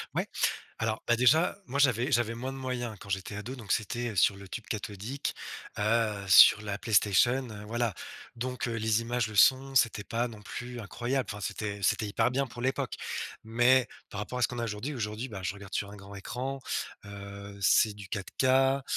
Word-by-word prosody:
Ouais, - - 0 0.5
alors, 110 -1 -1
bah, 120 - +4
déjà, 135 +11 +4
moi 135 +3 -3
j'avais 130 -1 +3
j'avais 115 -3 +2
moins 130 +3 -4
de - - -8
moyens 125 -3 -3
quand 100 - -11
j'étais 95 +1 -3
ado 115 +6 -5
donc 115 -6 -6
c'était, 120 +3 -1
heu, - - -9
sur 100 +1 +4
le 100 0 -11
tube 110 +5 -6
cathodique, 110 +5 -4 0.5
heu, 105 -2 +1
sur 100 +2 +9
la 100 -1 -3
PlayStation, 115 +5 +3
heu, 105 -1 -8
voilà. 115 -1 -1 0.4
Donc, 125 +1 -3
heu, 115 - -2
les 110 0 +1
images, 120 0 0
le 110 - -8
son, 135 +6 +5
c'était 115 -5 +3
pas 115 +3 -1
non 110 -3 -11
plus 120 +3 -6
incroyable, 120 +4 -2
enfin, 105 0 -7
c'était 105 0 -3
c'était 105 +3 +2
hyper 105 +4 +1
bien 135 +2 0
pour 120 -1 -9
l'époque. 130 +2 -1 0.5
Mais 120 +3 +4 0.2
par 100 - -5
rapport 105 +4 -4
à 125 - +1
ce - - +5
qu'on 125 - -6
a 120 - -1
aujourd'hui, 115 +7 -4
aujourd'hui, 110 0 -3
bah, 100 -4 -7
je 90 +1 -2
regarde 100 -1 -11
sur 100 - -1
un 105 - -10
grand 100 0 -12
écran, 125 +7 -4 0.5
heu, 100 0 -9
c'est 105 +2 +4
du 105 -1 -9
4K, 130 +7 +2
115 Hz, 205 wpm, -29 LUFS, 105-125 Hz, 0.5 s, sur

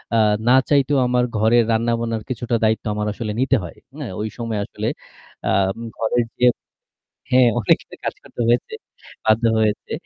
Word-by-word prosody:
আ - - +4 0.3
না 125 - +6 0.2
চাইতেও 140 0 +3
আমার 125 0 +2
ঘরের 115 +2 +4
রান্না-বানার 115 0 0
কিছুটা 120 -1 -2
দায়িত্ব 110 +1 +1
আমার 105 0 -2
আসলে 110 -1 -4
নিতে 135 +1 +3
হয়। 85 - -8 0.2
হ্যাঁ, 135 -10 -5
ওই 110 - -2
সময় 115 -2 -3
আসলে, - - -5 0.6
আম 95 0 +2 0.2
ঘরের 115 +1 +1
যে 125 - +4 0.9
হ্যাঁ, 125 -1 +6
অনেকেরই 110 - 0
কাজ - - -2
করতে - - -7
হয়েছে 120 - +1 0.5
বাধ্য 110 +2 +3 0.2
হয়েছে। 110 -1 -1
115 Hz, 155 wpm, -21 LUFS, 110-125 Hz, 0.9 s, না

